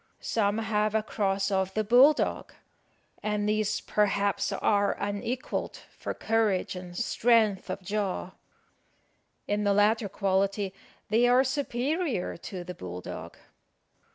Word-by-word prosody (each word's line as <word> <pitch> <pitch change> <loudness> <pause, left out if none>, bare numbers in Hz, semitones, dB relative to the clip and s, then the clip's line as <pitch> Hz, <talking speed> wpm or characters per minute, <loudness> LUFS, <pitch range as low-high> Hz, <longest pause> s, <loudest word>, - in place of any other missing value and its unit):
Some 205 -2 0
have 215 -1 0
a 220 - +2
cross 195 -2 -1
of 190 0 0
the 215 - +1
bull 250 +7 +7
dog; - - -3 0.7
and 210 -1 -1
these, 210 0 0
perhaps, 200 -1 +1
are 205 -1 +2
unequalled 205 +7 -3 0.2
for - - -5
courage 220 -5 0
and 180 -1 -8
strength 220 -5 +2
of 190 +1 -4
jaw. 195 -2 -2 1.2
In 205 0 0
the 200 -1 +3
latter 210 +1 +3
quality 195 0 0 0.4
they 230 +3 +4
are 250 +2 +5
superior 270 - -1
to 180 +1 -7
the 180 +1 -7
bull 90 - -7
dog. - - -8
205 Hz, 125 wpm, -28 LUFS, 195-225 Hz, 1.2 s, bull